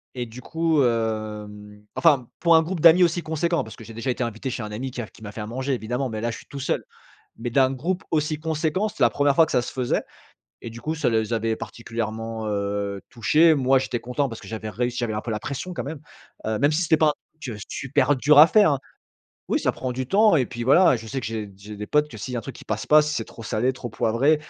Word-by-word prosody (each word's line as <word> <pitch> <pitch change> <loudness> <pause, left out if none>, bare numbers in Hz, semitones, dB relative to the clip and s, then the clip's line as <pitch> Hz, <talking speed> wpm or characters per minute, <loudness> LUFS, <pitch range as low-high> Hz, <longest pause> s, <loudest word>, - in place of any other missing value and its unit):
et 125 -1 -3
du 120 +2 -11
coup, 160 0 +1
hem, 105 -3 -3
enfin, 140 -7 +3
pour 170 -1 +5
un 160 - +5
groupe 175 +2 -4
d'amis 170 +3 +7
aussi 175 0 +2
conséquent, 170 +2 0
parce 110 - -10
que - - -12
j'ai 115 - -11
déjà 115 +4 -4
été 125 0 -1
invité 115 +2 -4
chez 125 -2 -4
un 105 - -6
ami 125 +5 -4
qui 125 - -7
a - - -5
qui - - -20
m'a 105 -1 -7
fait 110 - -7
à 105 - -4
manger, 130 +4 -2
évidemment, 125 +3 -3
mais 110 -1 -4
là, 120 +1 -1
je - - -6
suis - - -14
tout 140 - -8
seul, 135 - -1 0.6
mais 120 +1 -3
d'un 130 +2 +3
groupe 175 +8 -2
aussi 155 -1 0
conséquent, 160 +6 -1
c'était 215 - -11
la - - +6
1re 145 0 +2
fois 165 - +6
que - - -7
ça 125 - +2
se - - -6
faisait 125 -2 0 0.6
et - - -6
du 115 +1 -10
coup, 155 - -2
ça 155 - +1
les 110 0 0
avait 115 0 0
particulièrement, 115 -1 -5
heu, 100 -1 -2
touchés. 155 +8 +4
Moi, 135 -1 +3
j'étais 125 -2 -3
content 125 +4 -2
parce 115 - -8
que - - -11
j'avais 110 -1 -5
réussi. 120 +4 -2
J'avais 120 -3 -1
un 105 - -2
peu 115 - -5
la 105 - -2
pression, 140 +9 -5
quand - - -4
même. 150 +2 -6 0.5
Heu, 110 0 0
même 145 +2 +3
si 155 +3 +1
c'était 160 -1 +4
pas 155 - +4
un - - 0 0.3
truc, 120 -6 -5
heu, - - -10
super 140 +1 +1
dur 145 +3 +4
à 155 - +10
faire, 205 -1 +5
hein 140 - -2 0.7
oui, - - +1
ça - - +1
prend 130 -1 -4
du 130 +1 -3
temps 210 0 +5
et 130 -4 +2
puis, 120 0 -6
voilà, 140 +2 +6
je 115 -1 -9
sais 130 +4 -3
que - - -5
j'ai 110 -2 -5
j'ai 105 +2 -10
des 105 +1 -6
potes 150 +4 +2
que, 110 - -9
s'il 125 +4 -6
y - - -1
a - - -1
un - - -16
truc 135 - -8
qui - - -13
passe 110 0 -3
pas, 155 0 +7
si 150 0 -2
c'est 115 - -2
trop 115 - -12
salé, 120 +4 0
trop 120 -1 -7
poivré, 115 +8 +2
125 Hz, 275 wpm, -24 LUFS, 110-150 Hz, 0.7 s, à